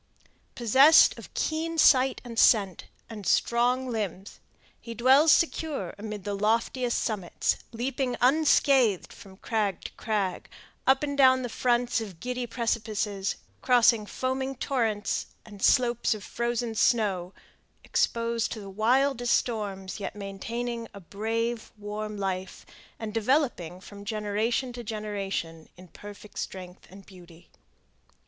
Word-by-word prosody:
Possessed 265 Hz, +7 st, +6 dB
of -, -, -12 dB
keen 325 Hz, +1 st, -2 dB
sight 265 Hz, -4 st, +4 dB
and 235 Hz, -2 st, -4 dB
scent, 195 Hz, -6 st, +4 dB, 0.2 s
and 215 Hz, -3 st, -9 dB
strong 245 Hz, +2 st, +2 dB
limbs, 205 Hz, -5 st, -5 dB, 0.4 s
he 230 Hz, -1 st, -8 dB
dwells 265 Hz, +7 st, +5 dB
secure 310 Hz, -, 0 dB
amid 210 Hz, -2 st, -6 dB
the 205 Hz, -, -3 dB
loftiest 230 Hz, +4 st, 0 dB
summits, 200 Hz, -6 st, -1 dB
leaping 250 Hz, +1 st, -2 dB
unscathed 265 Hz, -, +3 dB
from 190 Hz, -1 st, -14 dB
crag 210 Hz, -4 st, -2 dB
to -, -, -7 dB
crag, 205 Hz, -5 st, -3 dB, 0.4 s
up 270 Hz, +2 st, +4 dB
and 285 Hz, -1 st, -2 dB
down 260 Hz, -2 st, +5 dB
the 245 Hz, -, -3 dB
fronts 240 Hz, 0 st, +1 dB
of 195 Hz, -7 st, -8 dB
giddy 250 Hz, +3 st, -4 dB
precipices, 215 Hz, -4 st, -2 dB, 0.3 s
crossing 240 Hz, -4 st, +4 dB
foaming 265 Hz, +2 st, -3 dB
torrents 230 Hz, -6 st, -1 dB, 0.2 s
and 205 Hz, -2 st, -13 dB
slopes 240 Hz, -1 st, +3 dB
of 210 Hz, -, -9 dB
frozen 235 Hz, 0 st, -2 dB
snow, 200 Hz, -6 st, +1 dB, 0.5 s
exposed 230 Hz, 0 st, 0 dB
to 225 Hz, -, -7 dB
the 200 Hz, -2 st, -9 dB
wildest 245 Hz, +4 st, +2 dB
storms, 200 Hz, -5 st, -3 dB
yet 200 Hz, -, -5 dB
maintaining 230 Hz, +4 st, -5 dB
a -, -, -8 dB
brave, 225 Hz, +5 st, -3 dB
warm 210 Hz, 0 st, -5 dB
life, 190 Hz, -1 st, -4 dB, 0.3 s
and 220 Hz, -2 st, -6 dB
developing 225 Hz, -, 0 dB
from 200 Hz, +1 st, -12 dB
generation 220 Hz, +4 st, -1 dB
to 240 Hz, 0 st, -7 dB
generation 200 Hz, -7 st, -5 dB
in 180 Hz, +1 st, -13 dB
perfect 205 Hz, +3 st, -11 dB
strength 180 Hz, -1 st, -7 dB
and 195 Hz, +1 st, -14 dB
beauty. 175 Hz, -3 st, -16 dB
225 Hz, 125 wpm, -27 LUFS, 200-245 Hz, 0.5 s, Possessed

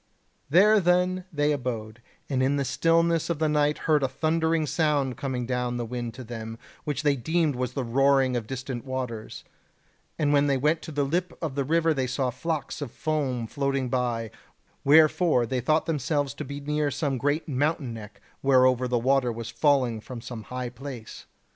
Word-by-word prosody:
There 205 Hz, +7 st, +6 dB
then 180 Hz, 0 st, +2 dB
they 150 Hz, -2 st, +1 dB
abode, 115 Hz, -5 st, -4 dB, 0.3 s
and 130 Hz, -2 st, 0 dB
in 135 Hz, +2 st, +2 dB
the 140 Hz, -1 st, 0 dB
stillness 165 Hz, +5 st, +2 dB
of 170 Hz, -, 0 dB
the 155 Hz, +1 st, +1 dB
night 150 Hz, 0 st, +2 dB
heard 155 Hz, -2 st, +3 dB
a 135 Hz, -, +2 dB
thundering 160 Hz, +3 st, 0 dB
sound 145 Hz, -3 st, +1 dB
coming 125 Hz, -1 st, -3 dB
down 125 Hz, 0 st, -1 dB
the 120 Hz, -, -2 dB
wind 120 Hz, 0 st, -5 dB
to 130 Hz, -, -8 dB
them, 115 Hz, -1 st, -7 dB, 0.3 s
which 150 Hz, 0 st, -2 dB
they 145 Hz, -1 st, +3 dB
deemed 160 Hz, +3 st, 0 dB
was 125 Hz, 0 st, -2 dB
the 135 Hz, -, -2 dB
roaring 135 Hz, +1 st, +3 dB
of 115 Hz, -3 st, -3 dB
distant 130 Hz, -1 st, -5 dB
waters; 125 Hz, -5 st, -5 dB, 0.7 s
and 145 Hz, -1 st, +2 dB
when 145 Hz, 0 st, +4 dB
they 140 Hz, -1 st, +2 dB
went 150 Hz, +4 st, +1 dB
to -, -, -8 dB
the 145 Hz, -1 st, 0 dB
lip 170 Hz, +5 st, -2 dB
of 160 Hz, -5 st, -3 dB
the 140 Hz, 0 st, -1 dB
river 165 Hz, +3 st, +2 dB
they 130 Hz, -3 st, -1 dB
saw 125 Hz, 0 st, -1 dB
flocks 150 Hz, +2 st, -3 dB
of 145 Hz, -, -3 dB
foam 140 Hz, -7 st, -1 dB
floating 135 Hz, +1 st, -1 dB
by, 120 Hz, -3 st, -1 dB, 0.5 s
wherefore 155 Hz, -2 st, +5 dB
they 125 Hz, +2 st, -2 dB
thought 155 Hz, +6 st, +2 dB
themselves 145 Hz, -2 st, -1 dB
to 150 Hz, -, -6 dB
be 140 Hz, +2 st, -6 dB
near 150 Hz, +1 st, 0 dB
some 140 Hz, -1 st, -2 dB
great 145 Hz, +5 st, 0 dB
mountain 145 Hz, -2 st, -1 dB
neck 105 Hz, -2 st, -10 dB, 0.2 s
whereover 130 Hz, -2 st, +4 dB
the 125 Hz, 0 st, +1 dB
water 130 Hz, +1 st, +2 dB
was 115 Hz, 0 st, -6 dB
falling 130 Hz, -7 st, +2 dB
from 125 Hz, +2 st, -8 dB
some 115 Hz, -1 st, -8 dB
high 125 Hz, -1 st, -4 dB
place. 125 Hz, -2 st, -9 dB
135 Hz, 185 wpm, -26 LUFS, 125-150 Hz, 0.7 s, There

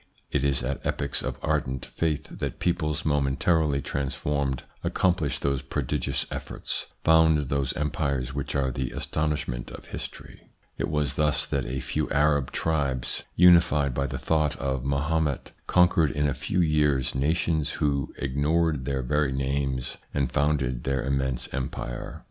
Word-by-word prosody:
It 70 Hz, -, +1 dB
is 70 Hz, -3 st, +1 dB
at 65 Hz, +3 st, -3 dB
epochs 70 Hz, -1 st, 0 dB
of -, -, -3 dB
ardent 70 Hz, -4 st, -1 dB
faith 75 Hz, -2 st, -2 dB
that -, -, -3 dB
peoples, 75 Hz, -4 st, 0 dB
momentarily 75 Hz, 0 st, +2 dB
transformed, 70 Hz, -1 st, -1 dB, 0.2 s
accomplish 85 Hz, -7 st, +1 dB
those 70 Hz, -1 st, 0 dB
prodigious 70 Hz, +1 st, -1 dB
efforts, -, -, -4 dB, 0.2 s
found 80 Hz, -3 st, +4 dB
those 70 Hz, -2 st, 0 dB
empires 70 Hz, -4 st, -1 dB
which 70 Hz, 0 st, -3 dB
are 65 Hz, -2 st, +1 dB
the 65 Hz, +1 st, -2 dB
astonishment 75 Hz, -6 st, -2 dB
of -, -, -11 dB
history. -, -, -8 dB, 0.3 s
It -, -, -2 dB
was 75 Hz, -2 st, 0 dB
thus 75 Hz, 0 st, +2 dB
that 70 Hz, -3 st, -2 dB
a 65 Hz, +2 st, -3 dB
few -, -, -2 dB
Arab 70 Hz, -2 st, +2 dB
tribes, 70 Hz, -6 st, -1 dB
unified 85 Hz, -6 st, +5 dB
by 70 Hz, +2 st, 0 dB
the 65 Hz, -, -4 dB
thought 75 Hz, +3 st, +1 dB
of 65 Hz, -2 st, -2 dB
Mahomet, 70 Hz, +1 st, 0 dB, 0.2 s
conquered 90 Hz, -3 st, +4 dB
in 75 Hz, +1 st, 0 dB
a 70 Hz, -, +1 dB
few 90 Hz, +8 st, 0 dB
years 75 Hz, -5 st, +2 dB
nations 80 Hz, +2 st, +1 dB
who 70 Hz, -3 st, 0 dB
ignored 75 Hz, +1 st, +1 dB
their 65 Hz, -1 st, -1 dB
very 75 Hz, +1 st, +1 dB
names, 65 Hz, -1 st, -1 dB, 0.2 s
and 70 Hz, -3 st, +1 dB
founded 65 Hz, -5 st, +1 dB
their 65 Hz, -2 st, 0 dB
immense 65 Hz, -2 st, -1 dB
empire. 60 Hz, -2 st, -4 dB
70 Hz, 145 wpm, -26 LUFS, 65-75 Hz, 0.3 s, unified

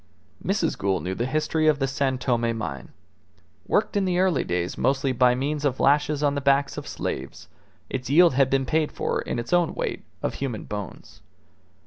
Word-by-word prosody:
Mrs. 185 Hz, -3 st, 0 dB
Gould 95 Hz, -1 st, 0 dB
knew 95 Hz, -, -2 dB
the 120 Hz, +6 st, -2 dB
history 155 Hz, +2 st, 0 dB
of 155 Hz, -2 st, +4 dB
the 135 Hz, -, 0 dB
San 135 Hz, -1 st, 0 dB
Tome 120 Hz, -3 st, 0 dB
mine. 80 Hz, -10 st, -5 dB, 0.8 s
Worked -, -, +1 dB
in 200 Hz, -1 st, +2 dB
the 180 Hz, -1 st, 0 dB
early 185 Hz, -5 st, +2 dB
days 90 Hz, 0 st, -2 dB
mostly 135 Hz, 0 st, +1 dB
by 125 Hz, 0 st, +4 dB
means 145 Hz, +3 st, -2 dB
of 135 Hz, -3 st, 0 dB
lashes 150 Hz, +1 st, +2 dB
on 145 Hz, -1 st, +3 dB
the 140 Hz, -, -2 dB
backs 140 Hz, 0 st, +2 dB
of -, -, -7 dB
slaves, 65 Hz, +1 st, -5 dB, 0.4 s
its 130 Hz, -2 st, -4 dB
yield 170 Hz, +2 st, +6 dB
had 135 Hz, 0 st, +3 dB
been 135 Hz, 0 st, +1 dB
paid 155 Hz, +3 st, +1 dB
for -, -, -2 dB
in -, -, -4 dB
its 120 Hz, +7 st, -3 dB
own 175 Hz, -2 st, +2 dB
weight -, -, -3 dB, 0.2 s
of -, -, -1 dB
human 125 Hz, -6 st, -4 dB
bones. 105 Hz, -3 st, -8 dB
135 Hz, 190 wpm, -25 LUFS, 120-150 Hz, 0.8 s, yield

